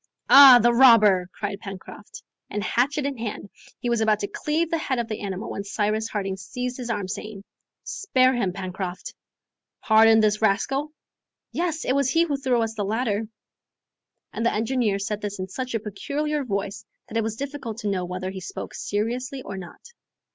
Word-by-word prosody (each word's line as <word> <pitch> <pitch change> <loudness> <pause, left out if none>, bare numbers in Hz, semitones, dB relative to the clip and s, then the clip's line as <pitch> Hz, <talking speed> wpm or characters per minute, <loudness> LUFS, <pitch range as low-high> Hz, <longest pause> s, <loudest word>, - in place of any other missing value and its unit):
"Ah, 275 -2 +11
the 240 0 +4
robber!" 215 -8 +6
cried 205 -1 -5
Pencroft. 195 - -10 0.3
And 210 - -3
hatchet 275 +6 0
in 280 -4 -3
hand, 210 -3 -5 0.3
he - - -5
was 235 -1 +1
about 215 -1 +2
to 200 - -1
cleave 305 +10 -1
the 330 - +1
head 265 -4 -2
of 235 -1 -2
the 215 -1 -5
animal, 195 -1 -5
when 200 - -4
Cyrus 215 +2 -1
Harding 195 -2 -3
seized 250 +6 -5
his 245 -2 -6
arm, 205 -4 -2
saying, 200 +1 -7 0.4
"Spare 265 -12 +2
him, 215 -7 0
Pencroft." 185 0 -6 0.7
"Pardon 220 0 +6
this 215 0 +2
rascal?" 270 +8 +1 0.6
"Yes! 335 -2 -2
it 255 - +1
was 280 -1 +2
he 330 +5 +3
who 305 -4 -1
threw 255 -4 +1
us 225 0 -3
the 215 -2 -3
ladder!" 215 0 -1 1.1
And - - -3
the 235 - +3
engineer 225 -2 0
said 205 +1 -3
this 205 0 -4
in 185 0 -4
such 255 +4 -4
a - - +1
peculiar 285 +8 -3
voice 200 -3 -3 0.2
that 225 - -4
it - - +2
was 220 0 -3
difficult 275 -4 -6
to 210 - -3
know 185 -2 -1
whether 185 +1 -4
he 190 -1 -7
spoke - - -7
seriously 250 +5 -3
or 195 - -7
not. 180 -2 -10
220 Hz, 185 wpm, -24 LUFS, 200-260 Hz, 1.1 s, Ah